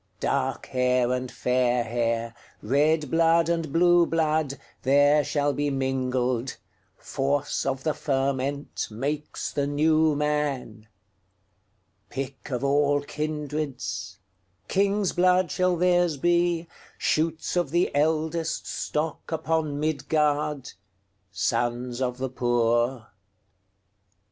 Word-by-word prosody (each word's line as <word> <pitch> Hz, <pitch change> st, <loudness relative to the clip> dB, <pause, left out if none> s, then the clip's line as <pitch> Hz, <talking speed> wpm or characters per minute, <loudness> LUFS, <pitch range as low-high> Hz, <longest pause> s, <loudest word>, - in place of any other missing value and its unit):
Dark -, -, -1 dB
hair 125 Hz, -1 st, +1 dB
and 125 Hz, 0 st, -2 dB
fair 125 Hz, -1 st, +1 dB
hair, 115 Hz, 0 st, -1 dB, 0.3 s
Red 150 Hz, +4 st, +2 dB
blood 165 Hz, 0 st, +3 dB
and 165 Hz, -3 st, -1 dB
blue 175 Hz, +1 st, +4 dB
blood, 155 Hz, -3 st, 0 dB, 0.2 s
There 145 Hz, +3 st, +4 dB
shall 145 Hz, +1 st, 0 dB
be 145 Hz, 0 st, -1 dB
mingled; 130 Hz, -2 st, -1 dB, 0.4 s
Force 140 Hz, +1 st, -1 dB
of 135 Hz, -1 st, -2 dB
the 155 Hz, -, +1 dB
fermentMakes 140 Hz, 0 st, -2 dB
the 140 Hz, -1 st, 0 dB
New 155 Hz, +1 st, +3 dB
Man.Pick 105 Hz, -4 st, -6 dB
of 125 Hz, -1 st, -3 dB
all 145 Hz, +1 st, +2 dB
kindreds, 145 Hz, -10 st, -4 dB, 0.5 s
King's 200 Hz, 0 st, +1 dB
blood 180 Hz, -1 st, +3 dB
shall 185 Hz, -1 st, +1 dB
theirs 175 Hz, -3 st, +2 dB
be, 175 Hz, +1 st, +1 dB, 0.3 s
Shoots 160 Hz, +2 st, 0 dB
of 175 Hz, -5 st, +1 dB
the 175 Hz, +4 st, +1 dB
eldestStock 160 Hz, 0 st, -1 dB
upon 160 Hz, -2 st, -1 dB
Midgard, 150 Hz, -2 st, 0 dB, 0.6 s
Sons 120 Hz, +6 st, -1 dB
of 125 Hz, -1 st, -1 dB
the 130 Hz, 0 st, -3 dB
poor. 120 Hz, -1 st, 0 dB
145 Hz, 95 wpm, -26 LUFS, 125-155 Hz, 0.6 s, blue